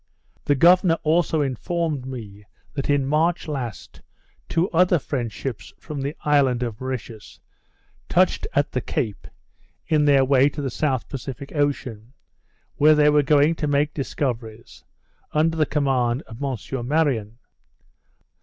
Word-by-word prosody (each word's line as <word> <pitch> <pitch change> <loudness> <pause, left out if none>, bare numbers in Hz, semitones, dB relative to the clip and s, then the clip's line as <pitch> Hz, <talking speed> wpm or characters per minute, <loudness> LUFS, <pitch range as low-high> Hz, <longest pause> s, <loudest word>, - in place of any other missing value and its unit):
The 145 - +3
governor 170 +2 +5
also 160 0 +2
informed 145 +1 -2
me, 105 -6 -8 0.3
that 140 -1 -4
in 145 -1 +2
March 160 +5 +1
last, 130 -8 -6 0.5
two 170 +3 +1
other 180 +1 +4
French 125 -6 -3
ships 105 -5 -6
from 145 -2 -7
the 140 +3 -3
island 135 -4 +2
of 115 -2 -5
Mauritius, 120 -5 -7 0.7
touched 185 +1 +2
at 145 0 +1
the 125 - -2
Cape 115 -9 -3 0.6
in 150 -2 +2
their 140 -2 +5
way 135 +1 +4
to 145 - -8
the 135 - -2
South 130 -2 -1
Pacific 135 0 -7
Ocean; 130 -6 -2 0.6
where 155 +1 +6
they 150 0 +5
were 150 0 +4
going 145 +2 +4
to 155 -2 -3
make 145 +1 +1
discoveries, 120 -5 -4 0.5
under 160 +2 +2
the 155 -2 +1
command 135 -3 0
of 115 +2 -12
M. 130 -2 -4
Marion. 130 -8 0
140 Hz, 140 wpm, -23 LUFS, 125-150 Hz, 0.7 s, where